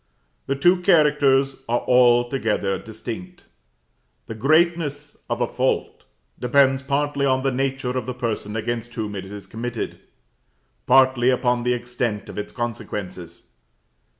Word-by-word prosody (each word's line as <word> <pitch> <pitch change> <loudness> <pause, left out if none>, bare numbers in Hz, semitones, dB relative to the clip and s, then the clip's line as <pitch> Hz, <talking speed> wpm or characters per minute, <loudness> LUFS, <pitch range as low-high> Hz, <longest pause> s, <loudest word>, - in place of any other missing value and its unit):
The 135 - 0
two 175 +5 +3
characters 145 -6 +3
are 120 - +1
altogether 120 -5 +2
distinct. 120 +11 -8 0.8
The - - -6
greatness 150 +2 +1
of 120 +1 -2
a - - +3
fault 130 +2 -2 0.3
depends 135 +1 +3
partly 140 +1 -1
on 130 0 +1
the 135 - +1
nature 130 -1 -2
of 130 - -3
the 125 - -4
person 110 -4 -3
against 120 +1 -3
whom 105 -2 -3
it 95 -1 -5
is 100 +1 -9
committed, 115 +1 -5 0.9
partly 130 -1 +5
upon 125 -1 +1
the 125 +1 +1
extent 120 -3 -3
of - - -6
its 105 - -5
consequences. 95 -7 -6
125 Hz, 130 wpm, -22 LUFS, 115-135 Hz, 0.9 s, partly